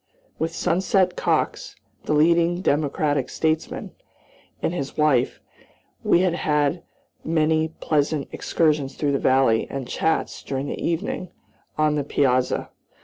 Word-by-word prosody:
With 165 +1 -1
Sunset 185 +1 +1
Cox, - - -1 0.3
the - - 0
leading 170 +3 +3
Democratic 145 -2 0
statesman, 160 0 -2 0.7
and 165 - -1
his 140 -6 -5
wife, 145 -5 +2 0.6
we 175 - +4
had 160 -3 +1 0.4
many 160 0 +2
pleasant 150 -1 0
excursions 150 -4 0
through 145 -2 0
the 140 - +1
valley, 130 -4 +3
and 135 -3 -5
chats, 160 - -1
during 135 0 -3
the - - -5
evening, 170 +2 -2 0.5
on 155 -1 +3
the 150 -1 0
piazza. 130 -2 +1
155 Hz, 120 wpm, -23 LUFS, 140-165 Hz, 0.7 s, we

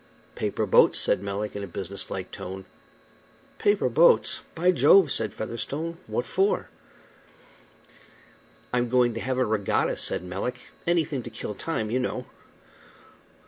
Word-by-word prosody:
"Paper - - -2
boats," - - +5
said - - +2
Melick, 100 +1 -4
in 100 - -4
a - - -5
business 95 +2 -7
like 95 -1 -5
tone. 95 +1 -7 0.9
"Paper 205 -9 +2
boats! 160 +8 +4
By 180 +2 +3
Jove!" 180 -2 +5
said 110 -1 0
Featherstone. 145 +9 -4
"What 120 - -2
for?" 195 +3 0 2.0
"I'm 120 -1 +1
going 125 -1 +3
to 115 - -4
have 130 +2 -2
a 130 - +2
regatta," 105 -2 0
said - - 0
Melick. 100 +8 -5 0.2
"Anything 165 -5 +1
to 120 - -8
kill 110 -2 -6
time, 110 -2 -3
you 125 - +1
know." 125 - -3
120 Hz, 140 wpm, -26 LUFS, 100-160 Hz, 2.0 s, boats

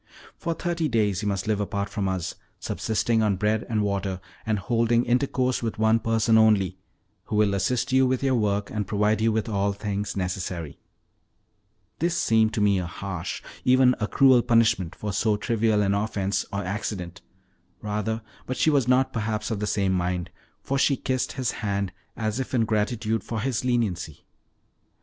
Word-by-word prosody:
For 170 -1 -3
thirty 170 -2 -1
days 105 -6 +1
you 105 - -2
must 100 -1 -1
live 110 -1 0
apart 100 0 -2
from 100 -2 -2
us, 90 -3 -2 0.3
subsisting 110 +1 0
on 105 -2 +2
bread 105 +3 0
and 110 -2 +1
water, 100 -2 -2 0.3
and 110 -1 +1
holding 115 +3 +1
intercourse 130 0 +1
with 115 -2 -3
one 110 +1 +3
person 115 0 +3
only, 100 -4 +3 0.5
who - - -3
will 105 -1 +3
assist 125 +7 0
you 130 0 +4
with 130 +1 0
your 135 -1 +2
work 105 -3 0
and 105 -3 -2
provide 105 +1 +1
you 115 0 +3
with 110 +1 -1
all 100 -2 0
things 100 0 -3
necessary." 90 -4 -4 1.2
This 170 +1 0
seemed 110 -1 +3
to 110 - 0
me 100 -2 +3
a 90 - -3
harsh, 90 -1 -5 0.2
even 130 0 +5
a 105 - 0
cruel 130 -1 +5
punishment 115 -8 +2
for 105 -1 -4
so 105 +2 +1
trivial 110 -1 +1
an 100 0 +1
offense, 100 -2 -1
or 100 0 -2
accident, 90 -2 -4 0.6
rather; 105 +1 -2 0.2
but 130 - -3
she 155 +5 +3
was 135 -5 +2
not 130 +1 +3
perhaps 110 0 -2
of 110 - -2
the 105 - -2
same 100 -2 +1
mind, 90 -1 -1 0.3
for 135 0 -1
she 140 -1 +3
kissed 130 -1 -1
his 130 -3 -1
hand, 100 -2 -2 0.3
as 110 +1 -2
if 130 0 -3
in 115 -2 +3
gratitude 110 +1 -1
for 115 - -4
his 125 +1 -1
leniency. 105 - -1
110 Hz, 175 wpm, -25 LUFS, 100-120 Hz, 1.2 s, even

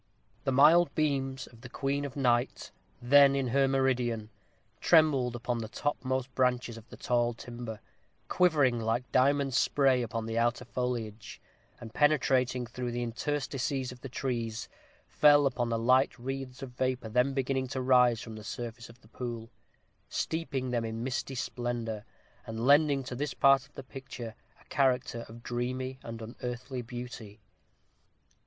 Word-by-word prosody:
The 135 - +2
mild 155 +6 +5
beams 135 -4 0
of 115 -1 -17
the 125 - -10
queen 140 +2 -1
of 140 - -7
night, 125 -2 0 0.3
then 140 +2 +6
in 135 -2 0
her 135 +2 +3
meridian, 125 -5 0 0.5
trembled 140 -7 +4
upon 120 0 -2
the 110 - -4
topmost 130 0 -2
branches 125 -2 +1
of 115 0 -13
the - - -11
tall 120 -1 +1
timber, 120 -2 -7 0.5
quivering 145 -9 +3
like 115 +2 -1
diamond 140 +1 +3
spray 135 -1 +3
upon 115 -1 -3
the 115 +1 -1
outer 120 +1 0
foliage; 115 -4 -4 0.4
and, 115 -1 -10
penetrating 130 -4 +2
through 120 +1 -5
the 120 0 -2
interstices 135 +1 -2
of 125 0 -12
the 135 - -7
trees, 120 -3 -3 0.4
fell 145 -1 +5
upon 120 -3 0
the 115 - 0
light 130 +3 +3
wreaths 135 +1 -6
of 130 - -7
vapor 130 -1 -2
then 125 +4 +2
beginning 130 -1 0
to 130 +1 -5
arise 125 -3 +4
from 110 -2 -8
the 110 - -9
surface 120 +1 -6
of 120 +1 -16
the - - -20
pool, 115 0 -6 0.6
steeping 140 -6 -2
them 120 -2 0
in 115 0 -4
misty 130 +1 -3
splendor, 120 -4 -3 0.4
and 115 +1 -3
lending 145 0 +5
to 125 - -6
this 145 +3 -3
part 135 -1 +4
of - - -33
the 135 - -7
picture 125 -2 -8 0.3
a - - -21
character 125 -3 0
of 115 +1 -12
dreamy 130 +2 -3
and 115 -1 -7
unearthly 125 +2 -5
beauty. 120 -3 -8
125 Hz, 155 wpm, -30 LUFS, 120-135 Hz, 0.6 s, then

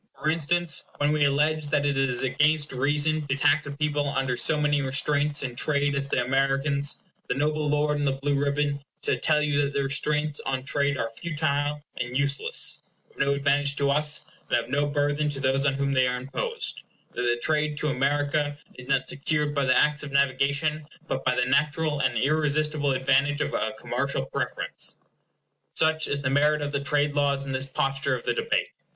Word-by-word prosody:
For 155 - +1
instance, 165 0 0
when 145 0 +2
we 150 -1 +3
allege 150 +2 +1
that 145 -1 +1
it 145 -1 +1
is 135 -2 +1
against 145 +3 +2
reason 145 +3 +1
to 135 - 0
tax 145 +1 +2
a - - -4
people 145 0 -1
under 135 -2 0
so 150 +5 +1
many 145 -1 +2
restraints 145 +2 0
in 125 -3 -4
trade 145 +2 +1
as 140 0 -2
the 125 -2 0
Americans, 135 +2 +1 0.3
the - - 0
noble 150 +1 0
lord 150 0 +1
in 145 - -1
the 135 - +2
blue 140 +2 -1
ribbon 140 0 0 0.2
shall - - +2
tell 150 -1 +2
you 145 -1 +2
that 140 0 -1
the 140 - 0
restraints 150 +2 0
on 130 -1 -2
trade 140 +1 0
are 115 -2 -2
futile 145 +1 -2
and 120 +1 -2
useless 140 0 0 0.3
of - - -21
no 140 0 +2
advantage 140 0 +1
to 140 0 +1
us, 150 +1 0 0.2
and - - +3
of 120 +1 -4
no 145 +1 +1
burthen 145 +1 0
to 140 -2 -5
those 135 +1 +1
on 135 - +1
whom 140 0 0
they 130 -1 +3
are 125 0 -1
imposed; 440 - -3 0.3
that - - -3
the 120 -1 +1
trade 150 +2 0
to 150 - 0
America 145 +2 0 0.2
is 125 - -10
not 135 -1 +1
secured 150 +1 -1
by 140 -2 +1
the 130 - +4
Acts 150 0 +3
of 150 - -6
Navigation, 140 +3 +1 0.2
but - - -2
by 130 -1 +1
the 125 - +2
natural 150 0 +1
and 130 -3 +1
irresistible 150 +1 +1
advantage 140 +3 +2
of - - -2
a - - -1
commercial 130 - -2
preference. - - -4 0.8
Such 160 0 +2
is 140 0 -2
the 130 - 0
merit 150 +2 +3
of 145 - -3
the 140 -1 -1
trade 145 0 +1
laws 140 -1 +1
in 135 - -5
this 130 +1 -3
posture 135 0 0
of 120 - -8
the - - +1
debate. - - 0
145 Hz, 200 wpm, -26 LUFS, 135-150 Hz, 0.8 s, the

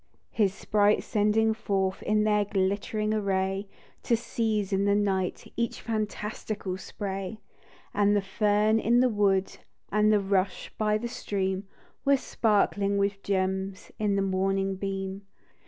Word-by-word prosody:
His 205 -4 +2
sprites 205 +1 +2
sending 215 +1 +2
forth 195 -3 -1
In 215 0 +2
their 210 -1 +3
glittering 200 +2 -1
array, 195 -1 0 0.3
To 235 - +2
seize 220 -4 -1
in 195 +1 +2
the 200 0 +3
night 190 -3 -1
Each 235 0 -1
fantastical 210 -3 -3
spray; 195 +1 -5 0.5
And 205 0 +3
the 205 - +3
fern 210 +2 +2
in 235 +2 +3
the 255 0 +4
wood, 195 -3 +1 0.3
And 210 +1 +4
the 210 - +4
rush 195 -1 -1
by 215 -1 +1
the 235 +2 -4
stream, 195 -4 -2 0.4
Were 280 0 +4
sparkling 205 -4 +1
with 200 0 0
gems 190 0 -2
In 205 -2 +1
the 195 - +1
morning 195 0 0
beam. 195 0 -4
200 Hz, 140 wpm, -28 LUFS, 195-215 Hz, 0.5 s, the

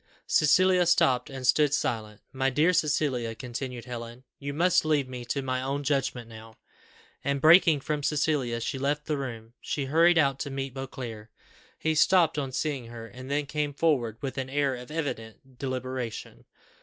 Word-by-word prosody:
Cecilia 180 +3 +4
stopped, 130 -7 +3
and 135 -2 -6
stood 145 +2 +4
silent. 110 -5 -3
"My 135 0 +1
dear 155 +7 +3
Cecilia," 135 -8 0
continued 125 0 -6
Helen, 120 0 -7 0.2
"you 140 0 -4
must 180 +5 +3
leave 150 -4 +1
me 125 -1 -7
to 135 +3 -2
my 130 -1 -1
own 140 +2 -2
judgment 135 -4 -1
now;" 110 0 -12 0.7
and, 140 0 0
breaking 160 -1 +6
from 150 +1 -2
Cecilia, 140 -5 0
she 135 - -3
left 145 +2 -1
the 155 - -1
room. 120 -5 -6
She 140 - -2
hurried 165 +5 +4
out 140 -4 +3
to 140 - -3
meet 135 -1 -4
Beauclerc. 120 -5 -7 0.5
He 160 - 0
stopped 165 -1 +4
on 135 -2 -3
seeing 135 -3 -2
her, 115 -1 -9
and 130 +3 -10
then 145 +1 0
came 150 0 -2
forward 130 -9 +1
with 135 -1 -4
an 130 0 -4
air 140 0 +1
of 125 0 -10
evident 135 -5 -6
deliberation. 130 -3 -5
135 Hz, 170 wpm, -27 LUFS, 125-150 Hz, 0.7 s, breaking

